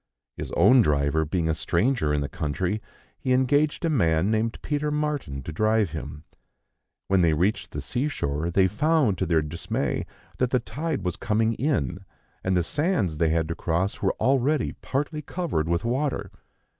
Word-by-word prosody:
His - - -6
own 120 +9 +6
driver 75 -2 +2
being 85 +1 -1
a 80 - +2
stranger 90 - +1
in 75 0 +1
the 70 - -1
country, 90 +10 -2 0.4
he 130 - +1
engaged 145 +6 +2
a - - +2
man 90 - +2
named 110 +1 0
Peter 150 0 -1
Martin 150 - -2
to 80 - -6
drive 110 +1 +2
him. 75 +1 -7 0.8
When 95 -1 +3
they 80 -3 +3
reached 95 +3 0
the - - -5
sea 130 +4 -1
shore 75 - -2
they 95 +2 +4
found, 130 - +2
to 95 - 0
their 80 -2 +2
dismay, 85 +3 -2 0.3
that 125 - +2
the 125 - +2
tide 145 +6 -3
was 90 -3 -2
coming 110 0 +1
in, 95 - -1 0.4
and 95 -1 +1
the 90 - +2
sands 130 - 0
they 80 - +3
had 80 0 +1
to - - 0
cross 85 +4 -1
were - - +2
already 135 +3 +1
partly 150 +3 -2
covered 145 - -2
with 85 +5 0
water. 135 +4 -1
100 Hz, 175 wpm, -25 LUFS, 80-135 Hz, 0.8 s, own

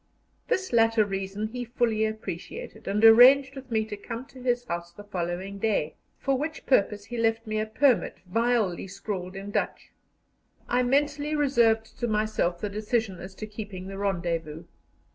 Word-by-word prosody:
This 375 - -1
latter 225 -1 +4
reason 195 +2 -3
he 245 +2 -4
fully 230 -2 +1
appreciated, 215 +1 -7
and 210 +3 +3
arranged 260 +4 +8
with 265 -1 -9
me 220 -2 +1
to 215 - -6
come 230 +4 -7
to 260 - -13
his 245 -1 0
house 170 -3 -4
the 205 +4 -12
following 190 0 -4
day, 200 -8 0 0.2
for 275 -1 0
which 310 +2 -4
purpose 205 -4 +2
he 240 +3 -6
left 225 0 +1
me 215 0 -2
a 215 - -1
permit, 255 +3 +2
vilely 220 -2 0
scrawled 190 -1 -5
in 195 +1 -6
Dutch. - - -2 0.8
I 245 +1 +2
mentally 290 +3 +1
reserved 235 -6 +2
to 240 - 0
myself 215 -5 0
the 210 - -2
decision 210 -1 -1
as 190 +1 -9
to 215 - -6
keeping 205 -3 -7
the 195 - -7
rendezvous. 170 -5 -2
215 Hz, 165 wpm, -27 LUFS, 195-245 Hz, 0.8 s, arranged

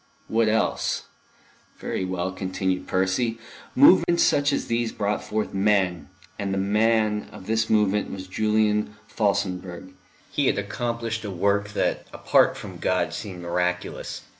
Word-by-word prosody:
What 115 0 +2
else?... 110 +1 0 0.7
Very 95 - -3
well, 95 0 -2
continued 95 0 -2
Percy, 95 +5 0 0.4
movements 175 - +6
such 145 0 +3
as 140 - -1
these 115 -1 -1
brought 105 0 -2
forth 110 -1 -3
men, 95 -3 +1 0.3
and 100 -1 -2
the 95 - -1
Man 105 +1 +1
of 95 - -11
this 110 +1 0
movement 105 -1 +2
was 95 -1 -6
Julian 105 +1 +1
Felsenburgh. 95 -4 -2 0.4
He - - +1
had - - +2
accomplished 115 +1 -3
a 105 - -4
work 100 +2 0
that - - -1
apart - - +3
from - - -9
God - - 0
seemed 90 -4 -6
miraculous. 90 +1 -2
105 Hz, 140 wpm, -24 LUFS, 95-110 Hz, 0.7 s, movements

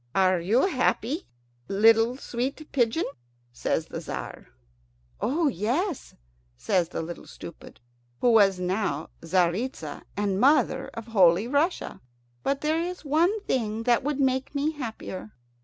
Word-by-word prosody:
"Are 185 -2 +4
you 210 - +3
happy, 285 - 0 0.4
little 225 +4 +4
sweet 270 +4 -4
pigeon?" 245 +4 +2 0.5
says - - -1
the - - -6
Tzar. - - -7 0.7
"Oh 310 +5 +1
yes," 270 - -1 0.4
says 170 - +1
the 165 - -4
Little 170 +1 -8
Stupid, 170 - -11 0.4
who 245 - +4
was 200 -4 +5
now 180 -5 -1
Tzaritza 175 - -1 0.2
and 200 -2 0
mother 265 0 +3
of 230 - -6
Holy 190 -1 +4
Russia; 290 +7 0 0.4
"but 275 - -1
there 315 +2 +1
is 355 -1 -5
one 340 +9 +2
thing 225 - -1
that 240 +1 +3
would 290 0 -1
make 265 +1 0
me 290 +2 +1
happier." 225 -7 -7
235 Hz, 130 wpm, -26 LUFS, 195-285 Hz, 0.7 s, was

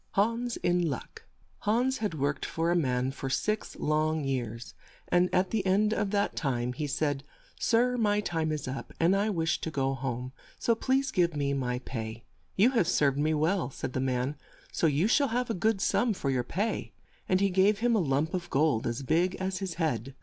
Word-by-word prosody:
HANS 230 +4 +1
IN 175 -1 +2
LUCK 135 - -7 0.3
HANS 245 +5 +1
had 210 -6 -2
worked 140 0 -1
for 165 +1 -1
a - - +2
man 130 -5 +1
for 135 0 -5
six 215 +11 -1
long 155 0 0
years, 120 -4 -3 0.4
and 180 0 +3
at 185 0 +1
the 220 -3 0
end 205 +3 +2
of 210 -3 0
that 200 0 0
time 125 -4 -1
he 150 +4 -3
said, 145 -1 -1 0.4
"Sir, 245 +2 +2
my 210 -3 +2
time 160 -6 -1
is 150 -3 -3
up 130 +1 -6
and 170 +4 +4
I 205 +2 +1
wish 165 -5 0
to - - -2
go 135 -3 0
home, 130 -1 -4 0.3
so 230 - +2
please 265 +3 0
give 170 -3 +2
me 140 -1 0
my 125 -3 -1
pay." 110 -2 -5 0.3
"You 220 +7 +5
have 230 -10 +2
served 145 -5 +2
me 155 +1 +2
well," 165 +4 +1
said 130 -1 -5
the - - -1
man, 130 +2 -1 0.3
"so 165 - +2
you 155 +6 +2
shall 280 +4 +3
have 245 0 -1
a - - 0
good 215 +2 +1
sum 230 +3 +1
for 140 -6 -1
your 125 -2 0
pay," 200 - -2 0.4
and 185 - +3
he 200 0 +2
gave 195 +3 +4
him 235 +1 +2
a - - +3
lump 150 0 0
of 175 -1 -3
gold 140 -5 +2
as 120 +3 -3
big 170 +6 +2
as 190 0 -3
his 190 -4 -4
head. 135 - -2
165 Hz, 210 wpm, -29 LUFS, 135-205 Hz, 0.4 s, You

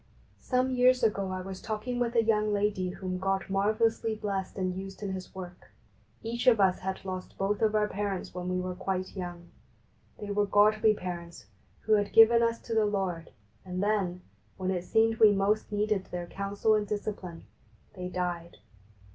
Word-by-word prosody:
Some 255 0 0
years 250 0 +4
ago 200 -3 +1
I 185 0 -3
was 190 0 -7
talking 230 +3 -3
with 240 0 -1
a 230 - +5
young 215 -1 +2
lady 205 -3 0
whom 185 0 -4
God 195 0 -1
marvellously 220 +3 +1
blessed 200 -3 -4
and 185 -1 -1
used 195 +1 -7
in 200 - -2
His 185 0 -8
work. 180 -1 -9 0.5
Each 235 +3 -3
of 230 -4 +6
us 190 -2 +3
had 190 +1 -5
lost 185 -1 -6
both 200 +1 -1
of 215 -1 +2
our 210 0 +3
parents 200 -2 -3
when 180 0 -4
we 180 0 0
were 180 0 -3
quite 185 +1 -3
young. 175 -2 -6 0.7
They 205 -1 -6
were 205 0 +1
godly 215 +2 +4
parents, 170 - -7 0.4
who 220 - +1
had 205 -1 +2
given 230 +1 +7
us 230 0 +1
to 230 - -5
the 220 -1 +3
Lord, 185 -5 -2 0.3
and 185 +1 -3
then, 195 -4 0 0.4
when 185 0 -1
it 180 -1 -2
seemed 225 +2 +2
we 215 -2 +8
most 205 +2 +1
needed 210 -2 0
their 175 -1 -5
counsel 200 +4 0
and 210 -1 +1
discipline, 195 -5 -5 0.5
they 180 -2 -6
died. 175 -2 -3
200 Hz, 180 wpm, -29 LUFS, 185-215 Hz, 0.7 s, we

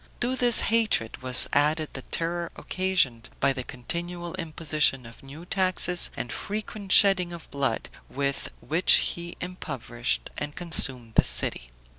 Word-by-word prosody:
To 250 +2 0
this 245 -2 +6
hatred, 220 - +1
was 130 0 +1
added 150 +2 +2
the 130 - -6
terror 170 +4 -4
occasioned 185 -12 -1
by 140 0 +2
the 130 -1 -5
continual 170 +8 -6
imposition 155 -6 0
of 115 - -13
new 145 +5 -11
taxes 185 -1 +2
and 120 - -4
frequent 210 -1 -5
shedding 190 -4 +6
of 170 -1 -11
blood, 140 -1 -2 0.2
with 140 0 -3
which 165 +4 +4 0.2
he 170 0 -9
impoverished 130 -9 -4
and 145 0 -5
consumed 130 -9 0
the - - +5
city. - - +1
165 Hz, 140 wpm, -26 LUFS, 135-180 Hz, 0.2 s, this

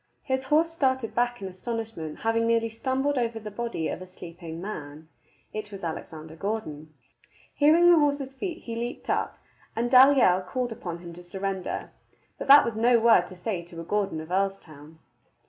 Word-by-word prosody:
His 260 0 -1
horse 315 +4 +3
started 260 -7 0
back 240 -3 0
in - - -3
astonishment, 200 -4 -5
having 225 0 +1
nearly 230 0 +2
stumbled 260 +4 -1
over 230 -2 -1
the 210 -1 -8
body 230 -6 -3
of - - -4
a 185 - -8
sleeping 170 -2 -9
man. 155 -5 -7 0.4
It 215 -1 -5
was 195 -2 -9
Alexander 160 -1 -6
Gordon. 160 -6 -4 0.6
Hearing 330 +4 +6
the 340 - +6
horse's 285 -2 0
feet, 340 +5 -5
he 230 - -5
leaped 240 +2 -4
up, - - -1 0.4
and 240 +1 -1
Dalyell 255 -8 +6
called 250 +4 -2
upon 175 -6 -5
him 170 0 -10
to 175 - -10
surrender. 190 +1 -4 0.5
But - - -5
that 280 +1 +9
was 235 - -3
no 240 +2 +5
word 225 -6 +5
to 185 - -11
say 180 0 -3
to 170 0 -11
a - - -5
Gordon 195 -2 -1
of 160 - -10
Earlstoun. 170 -6 -3
220 Hz, 180 wpm, -26 LUFS, 175-250 Hz, 0.6 s, that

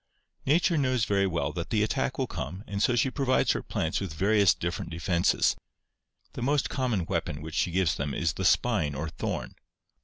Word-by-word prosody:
" - - -41
Nature 165 +2 +3
knows 130 -4 +1
very 100 -1 +2
well 85 -6 -1
that 85 -2 -4
the 110 -2 +2
attack 110 - -1
will - - 0
come 95 +3 -6
and 100 0 -4
so 120 - +3
she 130 +2 +2
provides 130 -2 +2
her - - -1
plants 80 - -2
with 90 -6 -5
various 100 +2 +4
different 85 0 -4
defenses. 85 +1 +1 0.8
The - - -6
most 140 +3 +1
common 120 -10 0
weapon 80 -4 -2
which 80 +1 -8
she 90 - +1
gives 85 -3 +1
them 70 +1 -3
is 80 +1 0
the 95 - -4
spine 90 - +2
or 80 +3 -3
thorn. 80 - -4
95 Hz, 195 wpm, -28 LUFS, 80-120 Hz, 0.8 s, various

